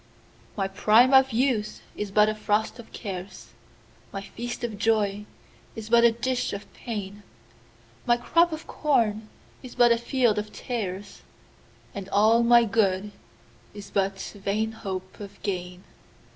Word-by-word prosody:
1My 195 -1 0
prime 225 +6 +5
of 265 0 +6
youth 235 -3 0
is 210 - -4
but 210 +2 +4
a 215 - 0
frost 215 +2 -1
of 230 - -12
cares,2My 195 0 -10
feast 240 +1 -6
of 220 -4 -4
joy 210 -2 +1 0.5
is 225 0 -8
but 235 0 +6
a 235 - +7
dish 250 +2 -2
of 200 +1 -8
pain,3My 120 - -6
crop 335 +7 +3
of 315 0 -6
corn 220 -7 0 0.3
is 255 - -11
but 240 -1 +5
a 235 - +3
field 235 -3 +1
of 210 0 -6
tares,4And 200 -2 -8
all 220 +3 +4
my 235 0 +6
good 205 -2 +1 0.6
is 205 -1 -10
but 195 -1 0 0.2
vain 210 +3 -1
hope 190 -4 -7
of 200 -1 -10
gain. 180 -2 -4
210 Hz, 135 wpm, -26 LUFS, 195-235 Hz, 0.6 s, a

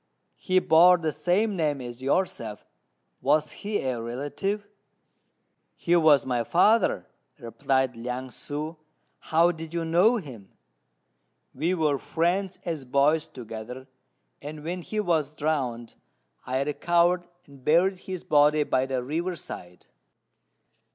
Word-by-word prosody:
He 185 -1 +1
bore 180 +1 +6
the 160 -2 -2
same 200 +7 0
name 150 -5 0
as 120 0 -8
yourself; 130 - -1 0.6
was 150 +1 +2
he 205 0 -3
a 125 -3 -2
relative?" 145 - -3 1.1
"He 175 - +1
was 155 -4 +5
my 125 -2 0
father," 195 - +3 0.3
replied 130 +1 -1
Liang 125 +2 -5
ssŭ; 150 +5 -6 0.4
"how 165 +2 +3
did 165 0 -8
you 165 -1 -1
know 180 +9 +4
him?" 125 - -9 1.0
"We 165 +7 0
were 150 -5 +1
friends 185 +3 -1
as 160 -5 -3
boys 140 +4 +2
together; 125 +2 -9 0.5
and 150 +1 -8
when 175 +3 -4
he 215 +5 -4
was 160 -7 0
drowned, 130 -7 -2 0.5
I 130 +2 0
recovered 175 +4 +1 0.2
and 140 -2 -17
buried 180 +6 +3
his 185 -2 -7
body 150 +1 +4
by 130 -2 0
the 130 -2 -2
river 170 +7 -2
side." 90 - -9
155 Hz, 125 wpm, -26 LUFS, 130-175 Hz, 1.1 s, bore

